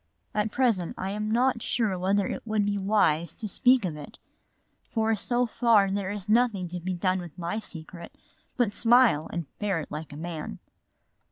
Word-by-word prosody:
"At 210 +1 0
present 225 -10 +1
I 190 +1 -3
am 210 +1 -3
not 240 +1 +2
sure 220 -5 0
whether 190 +2 +1
it - - -4
would 215 -2 0
be 205 0 0
wise 180 -5 +1
to 220 - -5
speak 250 +2 +3
of 165 -4 -3
it. 150 -1 -10 0.7
For 225 -1 +1
so 245 +4 +1
far 225 -4 +3
there 195 -1 -2
is 205 -1 -5
nothing 215 -4 +2
to 180 +1 -5
be 185 +2 -3
done 185 +1 0
with 175 -2 -9
my 175 +5 -3
secret 170 -3 -8 0.5
but 235 -5 +1
smile 235 -10 +4
and 170 -2 -3
bear 200 -5 0
it - - -10
like 155 +1 -6
a 145 - -8
man." 160 - -5
200 Hz, 185 wpm, -27 LUFS, 175-225 Hz, 0.7 s, smile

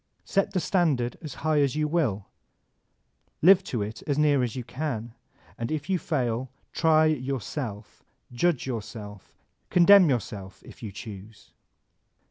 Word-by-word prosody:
Set 195 -1 +1
the 190 - 0
stand 170 -7 +2
ard 120 -1 -2
as 155 -4 -7
high 155 -2 +3
as 140 -1 +1
you 155 0 +1
will; 135 - 0 1.2
live 190 +2 +7
to 120 - -2
it 105 +2 -7
as 145 -2 0
near 150 -3 +3
as 120 -3 -2
you 125 - -4
can; 120 -4 -4 0.5
and 115 +3 -3
if 155 +4 -3
you 185 - +2
fail, 125 -5 -1 0.2
try 160 -1 +4
yourself, 130 -6 -3 0.3
judge 165 +3 +1
yourself, 105 - -7 0.4
condemn 180 0 +7
your 125 -3 +3
self, 95 -2 -10
if - - -14
you 110 -4 -6
choose. 105 +1 -11
130 Hz, 150 wpm, -26 LUFS, 110-155 Hz, 1.2 s, live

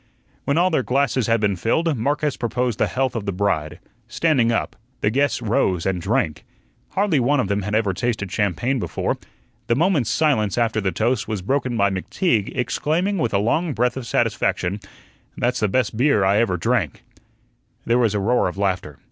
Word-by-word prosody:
When 140 - +1
all 180 +2 +3
their 155 - +2
glasses 130 -2 0
had 115 0 +3
been 105 -2 +1
filled, 155 - 0
Marcus 145 +4 0
proposed 120 -1 -2
the - - +3
health 130 -1 -1
of 110 -3 -4
the - - +1
bride, 90 -6 -1 0.3
"standing 135 -8 +2
up." 115 - -1 0.3
The 105 - +2
guests 140 0 +1
rose 95 -6 +1
and 95 -2 -1
drank. 100 - -1 0.5
Hardly 195 -7 +2
one 135 +4 +2
of 100 - 0
them 100 0 0
had 105 +2 -2
ever 105 -3 +1
tasted 105 -2 -2
champagne 110 - 0
before. - - -2 0.5
The 120 - +2
moment's 160 - +2
silence 130 -11 +1
after 115 -2 +1
the 95 -1 0
toast 115 +8 0
was 105 -4 -3
broken 130 +1 -1
by 100 -1 +3
McTeague 105 - -1
exclaiming 170 +9 0
with 120 - 0
a 100 - +2
long 145 - 0
breath 125 0 +1
of 130 -3 -6
satisfaction: 95 -1 0 0.6
"That's 125 +1 0
the 105 - +2
best 110 +1 0
beer 120 -4 +3
I 100 +1 +3
ever 110 -5 +1
drank." 80 - -1 0.8
There 120 +1 +2
was 110 -4 +2
a - - +1
roar 115 +3 +2
of 90 - -5
laughter. 95 -7 -2
115 Hz, 190 wpm, -22 LUFS, 100-135 Hz, 0.8 s, all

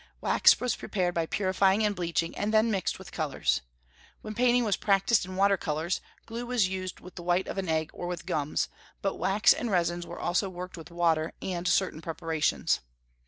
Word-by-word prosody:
Wax - - +5
was 250 -1 0
prepared 180 -3 -1
by 165 -1 0
purifying 195 +2 +2
and 205 -1 +1
bleaching, 170 -2 -1
and 205 +1 -1
then 220 +1 +4
mixed 195 -3 -1
with 190 0 -11
colors. 100 - 0 0.6
When 215 - -5
painting 245 +1 +3
was 210 -4 +2
practised 200 0 +2
in 185 - -7
watercolors, 180 -4 +1 0.2
glue 235 +1 -5
was 240 -6 +2
used 185 -1 -5
with 180 - -12
the 175 - -8
white 175 +2 +1
of - - -3
an 185 -3 -3
egg 160 -1 0
or 175 - -5
with 175 -2 -5
gums; 155 -5 -1 0.4
but 195 - -1
wax 200 +3 +4
and 240 - -3
resins 175 -2 0
were - - -7
also 180 +3 0
worked 180 0 -7
with 165 -1 -10
water, 165 -2 +1
with 180 -1 -3
certain 180 -2 +1
preparations. 165 -1 0
185 Hz, 190 wpm, -28 LUFS, 170-200 Hz, 0.6 s, Wax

